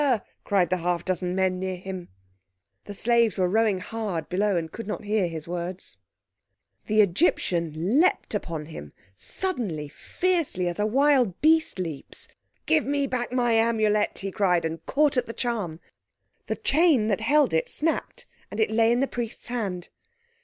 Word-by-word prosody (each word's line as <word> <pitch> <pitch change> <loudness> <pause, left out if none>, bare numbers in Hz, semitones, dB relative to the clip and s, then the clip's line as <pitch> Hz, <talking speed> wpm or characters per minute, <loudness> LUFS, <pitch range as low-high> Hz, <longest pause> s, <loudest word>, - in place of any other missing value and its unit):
cried 185 -4 +1
the 185 - +2
half 175 0 -1
dozen 180 -1 -1
men 190 -1 +1
near 190 0 -2
him. 185 -1 -7 0.8
The 205 - -7
slaves 235 0 +2
were 185 -1 +2
rowing 215 +1 +2
hard 205 -6 -4
below 200 +2 +1
and 160 -1 -3
could 230 -2 -7
not 215 - -4
hear 210 -3 +1
his 160 -2 -7
words. 175 +1 -5 0.9
The 215 0 +5
Egyptian 180 - +1
leaped 365 - +1
upon 165 -7 -3
him; 75 - -9 0.2
suddenly, 200 - -3
fiercely, 330 - -1
as 175 +2 -3
a 210 - +2
wild 260 -5 +3
beast 320 -4 +3
leaps. 165 -6 -5 0.4
"Give 155 - +3
me 285 +1 0
back 250 -3 -2
my 245 -2 +2
Amulet," 220 -2 +2
he 195 0 -4
cried, 180 -4 +2
and 160 0 -4
caught 295 -1 +2
at 250 - +1
the 230 - -5
charm. 210 -11 -3 0.7
The - - -1
chain 295 -7 +3
that 205 0 0
held 285 - +3
it 160 - +1
snapped, 330 +10 -2 0.2
and 205 - -6
it 220 -1 +2
lay 225 +1 +4
in 240 +2 +2
the 275 - +2
Priest's 235 -2 -5
hand. 195 -8 -3
210 Hz, 165 wpm, -26 LUFS, 180-240 Hz, 0.9 s, The